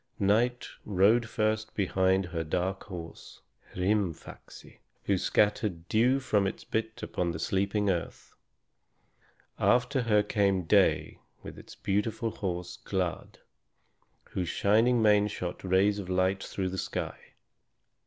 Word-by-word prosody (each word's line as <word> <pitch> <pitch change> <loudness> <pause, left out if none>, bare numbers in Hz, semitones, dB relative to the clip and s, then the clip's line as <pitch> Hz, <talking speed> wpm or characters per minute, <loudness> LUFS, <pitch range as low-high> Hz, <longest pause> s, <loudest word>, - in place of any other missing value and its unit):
Night 115 +4 +1 0.2
rode 105 +4 +3
first 110 0 -1
behind 95 -1 +1
her 85 -2 -3
dark 90 +4 -2
horse, 85 -5 -10 0.3
Hrîmfaxi, 95 -2 -3 0.2
who 100 - +1
scattered 100 -3 0
dew 125 +5 +3
from 105 -7 +1
his 95 - -4
bit 110 0 -3
upon 90 -1 -2
the 85 - -3
sleeping 100 +5 0
earth. 90 -3 -3 1.3
After 125 +2 +2
her 105 -3 +3
came 100 -3 +1
Day 80 - +2 0.2
with - - -8
his - - -13
beautiful 110 +3 -1
horse, 90 -4 -4
Glad, 90 -4 -3 0.9
whose 90 -3 -2
shining 115 +3 +3
mane 105 -1 +4
shot 90 -3 -5
rays 95 +2 +2
of 95 -2 -7
light 95 +1 +1
through 95 -1 -3
the 95 +1 -4
sky. - - -5
100 Hz, 125 wpm, -29 LUFS, 90-110 Hz, 1.3 s, mane